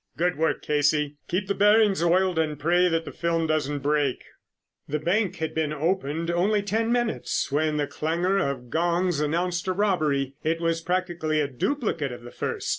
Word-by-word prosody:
"Good 180 Hz, +2 st, +1 dB
work, 160 Hz, +1 st, 0 dB
Casey. 150 Hz, 0 st, +1 dB
Keep 190 Hz, +2 st, -1 dB
the 200 Hz, -, +1 dB
bearings 210 Hz, -2 st, +4 dB
oiled 180 Hz, 0 st, +2 dB
and 155 Hz, -2 st, 0 dB
pray 175 Hz, +5 st, +3 dB
that 165 Hz, -1 st, 0 dB
the -, -, -6 dB
film 165 Hz, -1 st, -1 dB
doesn't 145 Hz, -2 st, -1 dB
break." 145 Hz, -3 st, 0 dB, 0.6 s
The 150 Hz, -, -1 dB
bank 185 Hz, +5 st, 0 dB
had 160 Hz, -3 st, -3 dB
been 160 Hz, -2 st, -1 dB
opened 165 Hz, 0 st, -1 dB
only 200 Hz, +4 st, +1 dB
ten 225 Hz, +3 st, 0 dB
minutes 240 Hz, -, -1 dB
when 155 Hz, +1 st, +1 dB
the 145 Hz, -, +1 dB
clangor 170 Hz, +7 st, 0 dB
of 135 Hz, -8 st, -3 dB
gongs 175 Hz, 0 st, +1 dB
announced 170 Hz, +4 st, -1 dB
a 185 Hz, -, +1 dB
robbery. 155 Hz, -9 st, +1 dB
It 165 Hz, +1 st, 0 dB
was 165 Hz, -1 st, 0 dB
practically 175 Hz, -3 st, -1 dB
a 145 Hz, -, +1 dB
duplicate 160 Hz, -, -2 dB
of 120 Hz, -1 st, -9 dB
the 120 Hz, -, -10 dB
first. -, -, -4 dB
165 Hz, 180 wpm, -25 LUFS, 150-185 Hz, 0.6 s, bearings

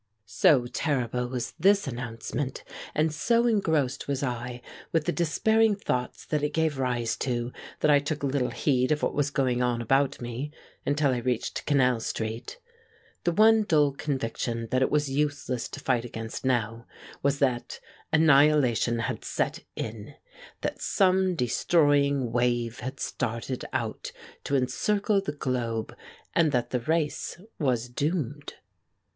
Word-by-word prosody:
So 120 Hz, +4 st, +4 dB
terrible 125 Hz, -2 st, -1 dB
was 125 Hz, -1 st, -4 dB
this 200 Hz, +4 st, +4 dB
announcement, 125 Hz, +2 st, -4 dB, 0.3 s
and 155 Hz, 0 st, +2 dB
so 235 Hz, +9 st, +2 dB
engrossed 160 Hz, -, +1 dB
was 140 Hz, -1 st, -1 dB
I 125 Hz, -1 st, -4 dB, 0.3 s
with 160 Hz, -2 st, +1 dB
the 175 Hz, -, +1 dB
despairing 215 Hz, +7 st, +2 dB
thoughts 125 Hz, -10 st, -3 dB
that 150 Hz, -2 st, -1 dB
it 150 Hz, -, -1 dB
gave 160 Hz, -4 st, +1 dB
rise 120 Hz, -3 st, 0 dB
to, 120 Hz, -1 st, -2 dB, 0.3 s
that 150 Hz, -, +4 dB
I 145 Hz, -, +6 dB
took 145 Hz, +1 st, -4 dB
little 135 Hz, -2 st, 0 dB
heed 130 Hz, -1 st, +1 dB
of 150 Hz, -, +1 dB
what -, -, +1 dB
was 145 Hz, -1 st, +1 dB
going 130 Hz, -3 st, 0 dB
on 120 Hz, -1 st, +1 dB
about 135 Hz, +4 st, +1 dB
me 120 Hz, +4 st, -5 dB, 0.4 s
until 145 Hz, 0 st, +2 dB
I 125 Hz, -, 0 dB
reached 120 Hz, -1 st, -2 dB
Canal 125 Hz, -5 st, +3 dB
Street. 110 Hz, -, -4 dB, 0.7 s
The 175 Hz, -, +3 dB
one 220 Hz, +4 st, +6 dB
dull 150 Hz, -8 st, +3 dB
conviction 115 Hz, -4 st, -3 dB
that 130 Hz, -, +2 dB
it 130 Hz, -, +3 dB
was 150 Hz, -2 st, +1 dB
useless 145 Hz, -3 st, -1 dB
to -, -, -8 dB
fight 125 Hz, -4 st, +1 dB
against 115 Hz, -2 st, -6 dB
now 115 Hz, -3 st, -1 dB, 0.3 s
was 140 Hz, 0 st, +1 dB
that 130 Hz, -4 st, -1 dB, 0.3 s
annihilation 145 Hz, -6 st, +4 dB
had -, -, -3 dB
set -, -, -1 dB, 0.2 s
in; 110 Hz, -1 st, -6 dB, 0.5 s
that -, -, -3 dB
some 190 Hz, -1 st, +2 dB
destroying 140 Hz, -1 st, +2 dB
wave 120 Hz, -1 st, 0 dB
had 130 Hz, +2 st, -6 dB
started 115 Hz, +3 st, -3 dB
out -, -, -3 dB, 0.3 s
to 140 Hz, -, 0 dB
encircle 200 Hz, +10 st, +1 dB
the 195 Hz, -, -3 dB
globe 120 Hz, -6 st, -2 dB, 0.4 s
and 165 Hz, -3 st, +3 dB
that 120 Hz, -2 st, 0 dB
the 125 Hz, -, +1 dB
race 155 Hz, +4 st, -1 dB, 0.2 s
was 125 Hz, -6 st, +1 dB
doomed. 145 Hz, +1 st, -3 dB
135 Hz, 145 wpm, -27 LUFS, 120-150 Hz, 0.7 s, I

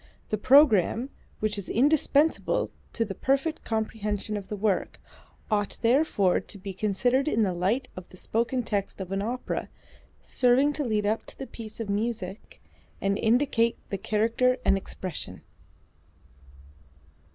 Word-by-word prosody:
The 215 Hz, -, 0 dB
programme 255 Hz, -, +5 dB, 0.3 s
(which 215 Hz, -1 st, 0 dB
is 195 Hz, -, -7 dB
indispensable 290 Hz, +4 st, +2 dB, 0.2 s
to 230 Hz, -, 0 dB
the 200 Hz, -, -5 dB
perfect 275 Hz, +8 st, 0 dB
comprehension 215 Hz, -1 st, -2 dB
of 200 Hz, -2 st, -5 dB
the 210 Hz, -, -4 dB
work) 205 Hz, -2 st, -1 dB, 0.5 s
ought 205 Hz, -1 st, 0 dB
therefore 230 Hz, -, +3 dB
to -, -, -9 dB
be 195 Hz, 0 st, -7 dB
considered 240 Hz, +8 st, +1 dB
in 225 Hz, -6 st, +2 dB
the 190 Hz, -3 st, +1 dB
light 200 Hz, +9 st, 0 dB
of 185 Hz, -1 st, -9 dB
the 185 Hz, -, -12 dB
spoken 235 Hz, +6 st, -1 dB
text 205 Hz, -3 st, -3 dB
of 190 Hz, -1 st, -6 dB
an 195 Hz, 0 st, -1 dB
opera, 240 Hz, +5 st, -3 dB, 0.5 s
serving 260 Hz, +4 st, +3 dB
to 295 Hz, -, -2 dB
lead 215 Hz, -4 st, 0 dB
up 215 Hz, +2 st, -1 dB
to -, -, -10 dB
the 270 Hz, -, -5 dB
piece 225 Hz, -4 st, -10 dB
of 225 Hz, -, -3 dB
music, 205 Hz, -1 st, -3 dB, 0.4 s
and 200 Hz, 0 st, +1 dB
indicate 235 Hz, 0 st, +2 dB
the 195 Hz, -, -1 dB
character 230 Hz, +5 st, +2 dB
and -, -, +5 dB
expression." 180 Hz, -, -6 dB
220 Hz, 145 wpm, -27 LUFS, 200-250 Hz, 0.5 s, programme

